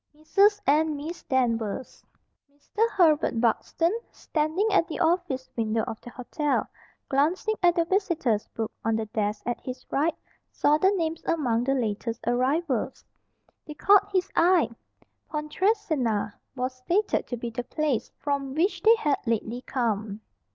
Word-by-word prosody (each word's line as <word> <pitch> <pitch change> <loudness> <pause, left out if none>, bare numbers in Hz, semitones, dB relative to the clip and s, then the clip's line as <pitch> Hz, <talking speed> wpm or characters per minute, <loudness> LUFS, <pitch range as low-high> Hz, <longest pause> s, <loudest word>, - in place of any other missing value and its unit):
"Mrs. 400 +7 +3
And 305 +1 +3
Miss 315 +5 -6
Danvers." 235 -3 -1 0.5
Mr. 420 +11 -1
Herbert 310 - +3
Buxton, 330 - +1 0.2
standing 315 +7 -1
at 365 -4 +3
the 320 - -5
office 330 -6 0
window 225 -1 0
of 220 - -6
the - - -10
hotel, 275 +4 -1 0.4
glancing 320 +10 +1
at 350 -1 +4
the 335 -2 +2
visitors' 330 - 0
book 225 -1 -2
on 225 0 +1
the 220 0 -1
desk 210 -1 -2
at 240 -1 -2
his 255 0 -7
right, 305 +4 +1 0.3
saw 300 +1 +2
the 380 - +5
names 330 -5 -1
among 245 -8 +1
the 270 +1 +2
latest 230 -1 -2
arrivals. 260 +2 0 0.6
They 300 - -7
caught 400 +5 +4
his 380 0 0
eye. 340 -8 +4 0.6
"Pontresina" 300 - 0 0.2
was 255 0 -2
stated 360 +11 0
to 245 - -4
be 235 0 -5
the 245 +2 -4
place 285 -2 -1
from 280 -2 -2
which 355 +6 +1
they 450 +1 +7
had 300 -11 +1
lately 230 +1 -1
come. 220 -4 -2
285 Hz, 145 wpm, -26 LUFS, 235-340 Hz, 0.6 s, they